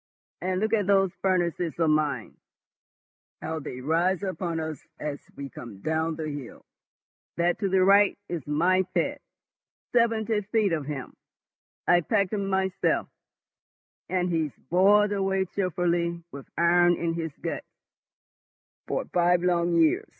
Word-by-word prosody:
And 185 0 -1
look 220 +2 0
at 205 -4 +2
those 195 -2 +4
furnaces 175 -3 0
of 165 -2 +2
mine, 150 -2 0 1.1
how 160 0 -3
they 130 -3 -7
rise 170 +7 +1
upon 170 -2 -3
us 160 -3 -4 0.2
as 150 -1 -3 0.2
we 140 -1 -6
come 110 -6 -10
down 160 +3 -1
the 155 -1 -4
hill. 145 -4 -8 0.7
That 175 +1 +1
to 200 -3 0
the 190 0 +3
right 200 +1 +5
is 175 -2 -3
my 175 +6 +3
pet—seventy 225 - -2
feet 215 -6 +2
of 155 -3 -1
him. 140 -3 -6 0.7
I 175 0 +5
packed 200 +1 0
him 200 -2 -1
myself, 190 0 0 1.0
and 180 -1 0
he's 160 -3 0 0.2
boiled 205 +3 +5
away 195 -1 0
cheerfully 170 -2 0
with 140 -1 -9
iron 175 +1 +4
in 170 -1 -1
his 165 -1 -3
guts - - -4 1.2
for - - -1
five 175 0 +3
long 175 -1 +2
years. 165 -2 +3
175 Hz, 135 wpm, -26 LUFS, 160-190 Hz, 1.2 s, right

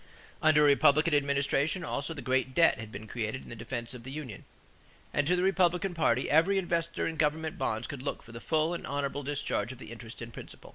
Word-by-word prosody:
Under 155 -1 +5
a - - +6
Republican 145 +3 +5
administration 140 +4 +1
also 140 +3 -3
the 145 - -7
great 130 0 0
debt 170 -8 +5
had 110 -1 -7
been 110 +2 -8
created 110 +3 -3
in - - -13
the - - -7
defense 115 +1 -5
of 125 - -9
the 125 - -9
union, 135 -7 -7 0.7
and 145 0 +1
to 180 - +4
the 180 - 0
Republican 185 -1 +2
party 130 -6 +2
every 165 +6 +4
investor 170 -2 -1
in 165 - -3
government 155 +1 0
bonds 110 +2 -1
could 140 -3 -6
look 140 - -4
for 115 - -14
the 115 0 -9
full 160 +1 +1
and 170 - -5
honorable 140 0 -2
discharge 145 -3 -2
of 130 - -9
the 115 - -10
interest 115 0 -9
and 115 0 -8
principal. - - -11
145 Hz, 225 wpm, -30 LUFS, 120-160 Hz, 0.7 s, a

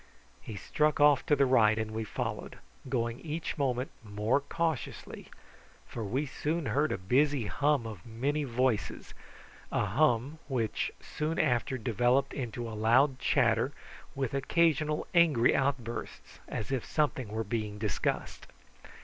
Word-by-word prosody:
He 110 - -8
struck 150 +10 0
off 145 -2 +5
to 145 - +5
the 140 -1 +4
right 110 -4 +4
and 110 -1 -2
we 110 +1 -3
followed, 110 - -4 0.3
going 120 -2 -1
each 160 0 -4
minute 130 -2 0
more 105 +4 0
cautiously, 160 0 -3 0.6
for 115 - -6
we 130 +8 -1
soon 150 +4 -2
heard 145 +3 +1
the - - -1
busy 130 +6 +2
hum 140 +6 +1
of 105 -6 -7
many 135 +6 -1
voices 125 -3 -1 0.6
a - - +1
hum 135 +5 +1
which 120 -6 -1
soon 155 +2 -3
after 130 -2 +1
developed 125 +4 +1
into 120 -2 -4
a 115 - -6
loud 130 +5 +3
chatter, - - +2 0.4
with 135 -3 -2
occasional 150 +1 +1
angry 155 -9 +5
outbursts, 130 -4 -3
as 110 - -4
if 130 -4 0
something 145 -5 0
were 110 +2 -3
being 105 -1 -3
discussed. 105 -1 -2
130 Hz, 140 wpm, -30 LUFS, 110-145 Hz, 0.6 s, off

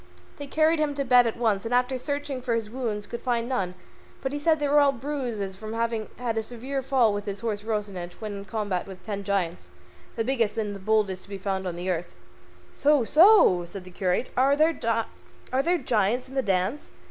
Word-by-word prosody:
They 285 - -6
carried 315 +3 +3
him 295 -2 0
to 280 -1 -1
bed 245 -1 +6
at 225 - -3
once, 220 -5 +1
and 230 - -5
after 250 +1 +2
searching 285 0 -3
for 245 -2 0
his 220 -2 -3
wounds 225 -5 -3
could 235 - -6
find 235 -2 0
none, 190 -8 -2 0.5
but 265 +1 -2
he 290 - -2
said 315 +2 +3
they 295 - 0
were 295 +1 +5
all 285 -1 +5
bruises 240 -7 -4
from 215 +3 -7
having 230 -1 -1
had 230 -2 -1
a - - 0
severe 250 +5 -4
fall 255 -5 +3
with 205 +1 -4
his 200 0 -4
horse 215 -3 -2
Rocinante 205 -5 -3
when 215 -2 -5
in 200 - -8
combat 200 -3 -2
with 190 -1 -10
ten 200 -2 -4
giants, 190 -3 -2 0.5
the 225 - 0
biggest 230 -4 0
and 210 -2 -2
the - - -8
boldest 200 -2 +1
to - - -11
be 200 - -5
found 190 -1 -2
on 170 -1 -4
earth. 175 - -2 0.6
"So, 290 -2 +3
so!" 310 - +6
said 185 +2 -8
the 185 - -12
curate, 180 +5 -1
"are 270 +2 +4
there 310 +3 +4
giants 245 - -1
in 265 - -13
the 270 - +1
dance? 195 +6 -1
230 Hz, 210 wpm, -26 LUFS, 200-265 Hz, 0.6 s, bed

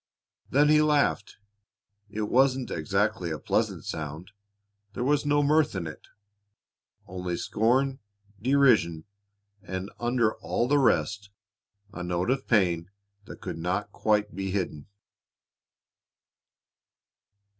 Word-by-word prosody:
Then 145 +2 +4
he 150 0 +6
laughed. 150 -8 +1 0.7
It 105 +1 -3
wasn't 130 +3 +2
exactly 95 +2 0
a 80 - -3
pleasant - - -1
sound. 80 +5 -6 0.6
There 120 - -3
was 145 +2 +1
no 145 0 +3
mirth 150 -3 +3
in 90 -3 -3
it; 75 -2 -9 1.0
only 90 -1 -4
scorn, 130 +5 +1 0.4
derision, 115 - +3 0.6
and, 95 -1 -5
under 120 -2 +1
all 90 +8 -1
the 145 +2 +3
rest, 105 -5 +1 0.6
a 90 - -6
note 90 +5 -1
of 135 0 -2
pain 90 -6 +2 0.4
that - - -11
could - - -5
not 90 +5 -2
quite 105 -1 0
be 95 0 -3
hidden. 90 -7 -3
105 Hz, 115 wpm, -27 LUFS, 90-130 Hz, 1.0 s, he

